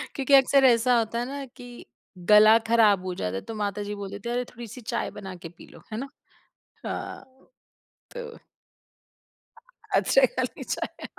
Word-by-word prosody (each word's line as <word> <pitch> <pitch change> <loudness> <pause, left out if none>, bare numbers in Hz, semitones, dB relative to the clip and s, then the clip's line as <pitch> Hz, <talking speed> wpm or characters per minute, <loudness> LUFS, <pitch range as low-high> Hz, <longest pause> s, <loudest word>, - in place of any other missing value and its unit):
क्योंकि 275 0 -1
अक्सर 275 0 +6
ऐसा 245 0 +4
होता 230 0 -1
है 240 - -2
ना 275 +1 -6
कि, 245 -1 -13 0.4
गला 215 +1 +8
खराब 215 -5 +4
हो 185 - -3
जाता 90 - -3
है 95 - -3
तो 225 - -8
माताजी 205 0 -3
बोल 200 -1 -6
देती 200 +3 -7
हैं, 240 - -1
"अरे, 250 0 -1
थोड़ी-सी 240 +1 -10
चाय 235 +1 -3
बना 190 -3 -8
के 170 -1 -10
पी 175 - -16
लो", - - -16
है 215 - -4
ना? 275 +1 -6 0.8
हाँ, - - -5 0.9
तो 475 -1 -8 1.6
अदरक - - +3
वाली - - -3
चाय, - - -5
230 Hz, 165 wpm, -26 LUFS, 205-255 Hz, 1.6 s, गला